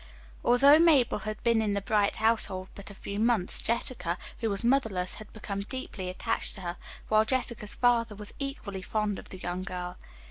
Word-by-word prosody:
Although 275 Hz, +5 st, +6 dB
Mabel 300 Hz, -10 st, +4 dB
had 215 Hz, 0 st, -6 dB
been 230 Hz, -2 st, +3 dB
in 205 Hz, -2 st, 0 dB
the -, -, +1 dB
Bright 205 Hz, 0 st, +1 dB
household 210 Hz, -4 st, +1 dB
but 200 Hz, -, -8 dB
a 200 Hz, -, -11 dB
few 200 Hz, +1 st, -5 dB
months, 220 Hz, -5 st, +3 dB
Jessica, 215 Hz, -6 st, +1 dB, 0.2 s
who 225 Hz, -, -1 dB
was 200 Hz, +1 st, -1 dB
motherless, 225 Hz, -8 st, +1 dB
had 215 Hz, -, -12 dB
become 205 Hz, -2 st, -5 dB
deeply 200 Hz, -4 st, -6 dB
attached 225 Hz, +5 st, -2 dB
to 195 Hz, -, -10 dB
her, 175 Hz, 0 st, -5 dB, 0.3 s
while 215 Hz, 0 st, +4 dB
Jessica's 235 Hz, -3 st, -1 dB
father 235 Hz, -3 st, +2 dB
was 205 Hz, 0 st, -4 dB
equally 275 Hz, -9 st, -5 dB
fond 210 Hz, 0 st, -2 dB
of -, -, -13 dB
the 185 Hz, -, -8 dB
young 180 Hz, 0 st, -4 dB
girl. 180 Hz, -1 st, -5 dB
215 Hz, 185 wpm, -29 LUFS, 190-235 Hz, 0.3 s, Although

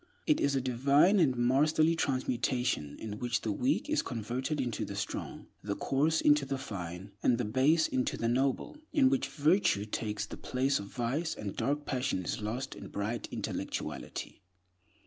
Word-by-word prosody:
It 305 Hz, -, +3 dB
is 140 Hz, -1 st, +2 dB
a 135 Hz, -, +1 dB
divine 140 Hz, -, +4 dB
and 140 Hz, -7 st, +4 dB
masterly 155 Hz, +6 st, +3 dB
transmutation 125 Hz, -, 0 dB
in 105 Hz, -1 st, -6 dB
which 125 Hz, 0 st, -1 dB
the -, -, -1 dB
weak 285 Hz, -1 st, 0 dB
is 310 Hz, 0 st, +2 dB
converted 125 Hz, +6 st, -3 dB
into 120 Hz, -4 st, -1 dB
the -, -, -5 dB
strong, -, -, -4 dB, 0.2 s
the 100 Hz, -1 st, -3 dB
coarse 155 Hz, +8 st, +1 dB
into 145 Hz, -1 st, +5 dB
the 135 Hz, 0 st, -2 dB
fine, 95 Hz, -6 st, -6 dB
and 120 Hz, -, +3 dB
the 125 Hz, -, -1 dB
base 140 Hz, +8 st, +3 dB
into 130 Hz, -, -1 dB
the 115 Hz, -, -1 dB
noble; 130 Hz, -, 0 dB
in 270 Hz, -3 st, +4 dB
which 275 Hz, -, +1 dB
virtue 145 Hz, -, +2 dB
takes 105 Hz, -1 st, -3 dB
the -, -, -8 dB
place 135 Hz, +2 st, 0 dB
of 100 Hz, -, -7 dB
vice, 130 Hz, +9 st, -2 dB
and 100 Hz, -2 st, -5 dB
dark 145 Hz, +1 st, -1 dB
passion 125 Hz, -8 st, -1 dB
is -, -, -2 dB
lost 115 Hz, +5 st, -3 dB
in -, -, -9 dB
bright 105 Hz, +3 st, -3 dB
intellectuality. -, -, -5 dB
130 Hz, 170 wpm, -31 LUFS, 115-150 Hz, 0.2 s, into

